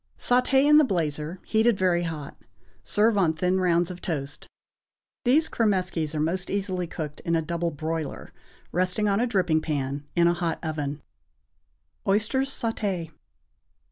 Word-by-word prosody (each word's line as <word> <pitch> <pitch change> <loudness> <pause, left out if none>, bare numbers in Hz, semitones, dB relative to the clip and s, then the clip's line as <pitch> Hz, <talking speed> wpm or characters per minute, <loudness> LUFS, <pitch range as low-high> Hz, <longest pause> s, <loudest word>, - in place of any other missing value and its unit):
Sauté 250 +2 +3
in 300 +1 +7
the - - +6
blazer, 165 - -2
heated 220 0 +3
very 180 -2 +2
hot. 160 -4 -5 0.5
Serve 210 0 +2
on 165 -4 +3
thin 180 +4 +1
rounds 175 -1 +2
of 180 - -9
toast. 145 -4 -4 0.8
These 300 +6 +4
cromeskies 180 -8 0
are - - -1
most 175 +4 -1
easily 190 -3 -2
cooked 155 -3 -6
in 170 - -1
a 165 - +2
double 170 +1 -1
broiler, 160 0 -4 0.4
resting 185 +4 +1
on 200 0 +2
a 245 - +2
dripping 180 -8 +2
pan, 145 -2 -3
in 170 -1 +4
a 170 - +4
hot 175 -1 -2
oven. 150 -2 -3 1.0
=Oysters 220 +7 +2
Sauté. 200 - -2
175 Hz, 145 wpm, -26 LUFS, 160-205 Hz, 1.0 s, in